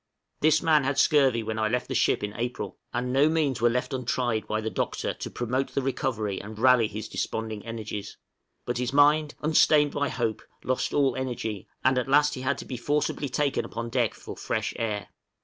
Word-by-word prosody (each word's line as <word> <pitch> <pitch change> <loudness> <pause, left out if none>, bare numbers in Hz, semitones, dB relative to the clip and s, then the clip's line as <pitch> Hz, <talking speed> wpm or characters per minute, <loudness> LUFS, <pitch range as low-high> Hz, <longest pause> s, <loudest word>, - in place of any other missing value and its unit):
This 155 +2 +3
man 155 -3 +4
had 135 +1 -1
scurvy 135 -6 +4
when 110 0 -3
I 110 - +2
left 125 +3 -1
the - - -3
ship - - +2
in 105 0 -3
April, 120 +3 -4
and 125 +1 -2
no 140 +3 +5
means 150 -7 0
were 120 - +5
left 125 +3 -2
untried 120 -3 -1
by 110 - -1
the 110 0 -3
Doctor - - -2
to - - -6
promote 130 +2 -2
the 140 - +2
recovery 120 -7 -2
and 105 +1 -9
rally 125 -1 +5
his 110 +1 -6
desponding 110 -2 -4
energies; 110 -3 -6 0.5
but - - -2
his 125 0 -1
mind, 150 +1 +4
unsustained 150 -1 +4
by 145 -1 -1
hope, 115 -4 -2 0.2
lost 130 0 -1
all 135 -4 +3
energy, 120 -6 -4 0.2
and 130 0 +3
at 125 - -3
last 150 +1 +4
he 130 - -5
had 130 +2 0
to - - -7
be 130 - -5
forcibly 145 +2 -1
taken 140 -1 0
upon 115 0 -5
deck 120 -3 0
for - - -9
fresh - - -2
air. 105 -4 -3
125 Hz, 200 wpm, -27 LUFS, 110-140 Hz, 0.5 s, no